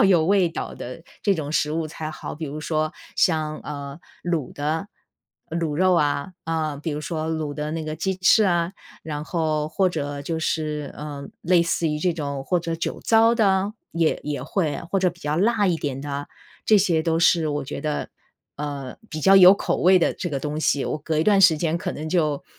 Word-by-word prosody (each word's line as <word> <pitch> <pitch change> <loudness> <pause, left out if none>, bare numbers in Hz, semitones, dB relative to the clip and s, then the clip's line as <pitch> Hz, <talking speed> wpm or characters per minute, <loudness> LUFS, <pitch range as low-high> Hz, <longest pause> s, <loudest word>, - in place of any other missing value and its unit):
要 - - +6
有 175 -5 +5
味 190 -3 +4
道 - - -5
的 125 +6 -8 0.2
这 200 -2 +3
种 150 -2 -4
食 150 0 +1
物 160 0 -1
才 155 0 -6
好。 - - -7
比 160 - -5
如 150 +2 -6
说 155 0 -1 0.2
像， 155 -3 +1
呃， 140 0 -7 0.2
卤 170 -7 -2
的， 155 +7 -2 0.6
卤 160 -2 -2
肉 185 +1 +4
啊， 145 +2 0
呃， 155 -3 -2
比 165 - -2
如 150 - -3
说 160 0 -3
卤 155 -2 -2
的 150 0 -3
那 160 -1 -3
个 155 0 -4
鸡 190 +3 -1
翅 190 +4 +5
啊， 175 -2 +1 0.3
然 150 -1 -5
后 155 -3 -1
或 185 +4 +2
者 145 -4 -4
就 160 +3 -3
是， 150 -2 -2
呃， 145 0 -7
类 175 -1 +4
似 170 -1 0
于 150 0 -1
这 175 +2 +1
种 140 -4 -4
或 180 +3 +1
者 165 -1 -3
酒 165 - -3
糟 225 +1 +4
的， 200 -2 +2 0.2
也 165 -1 +1
也 145 -3 -3
会， 155 0 -1
或 195 - +2
者 185 -1 +2
比 175 0 -19
较 150 +1 -1
辣 210 +2 +3
一 175 -3 +2
点 140 -4 -4
的， 145 0 -5 0.4
这 215 - +6
些 170 -5 +2
都 165 -1 +1
是 165 -2 +4
我 145 -1 -2
觉 - - -6
得， 150 -1 -2 0.5
呃， 140 -3 -5
比 155 -1 -4
较 195 +5 +6
有 185 0 +10
口 - - -1
味 185 +1 +6
的 - - +1
这 175 - -4
个 140 - -1
东 150 +1 -3
西。 140 -3 +1
我 - - -2
隔 155 +1 -2
一 155 - +2
段 205 -2 +5
时 165 -5 +6
间 165 0 0
可 - - -3
能 155 +2 -5
就 155 -5 0
160 Hz, 230 characters per minute, -23 LUFS, 150-175 Hz, 0.6 s, 有